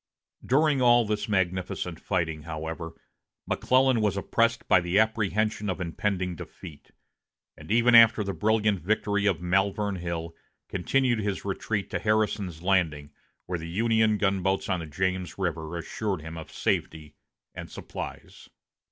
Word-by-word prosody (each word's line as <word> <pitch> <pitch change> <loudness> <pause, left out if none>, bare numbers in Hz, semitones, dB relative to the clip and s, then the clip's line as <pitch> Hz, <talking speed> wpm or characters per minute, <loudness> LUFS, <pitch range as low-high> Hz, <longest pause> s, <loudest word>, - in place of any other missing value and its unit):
During 145 +1 +2
all 120 -1 +5
this 105 0 -2
magnificent 90 -3 -1
fighting, 80 -5 -2
however, 80 +1 -6 0.5
McClellan 130 -2 +2
was 100 -2 +1
oppressed 115 +3 0
by 95 - +5
the 90 +3 0
apprehension 110 -1 +1
of 95 - -2
impending 90 +1 -2
defeat; 75 -2 -11 0.7
and - - -13
even 120 +2 +4
after 115 -1 +7
the 100 -1 -3
brilliant 105 -1 +1
victory 105 +2 0
of 90 -3 0
Malvern 95 +2 +1
Hill, 85 -1 -5 0.3
continued 120 +5 +1
his 100 -2 -3
retreat 100 +1 -3
to - - -1
Harrison's 105 -6 0
Landing, 80 -7 +1 0.3
where 90 -1 -3
the 85 +1 -7
Union 110 +2 +2
gunboats 95 -1 0
on 95 -2 +1
the 80 - -6
James 95 +3 -2
River 85 -3 -3
assured 95 +1 -3
him 80 +1 -7
of 80 -1 -9
safety 75 -2 -2 0.4
and - - -8
supplies. - - -8
95 Hz, 140 wpm, -27 LUFS, 85-110 Hz, 0.7 s, after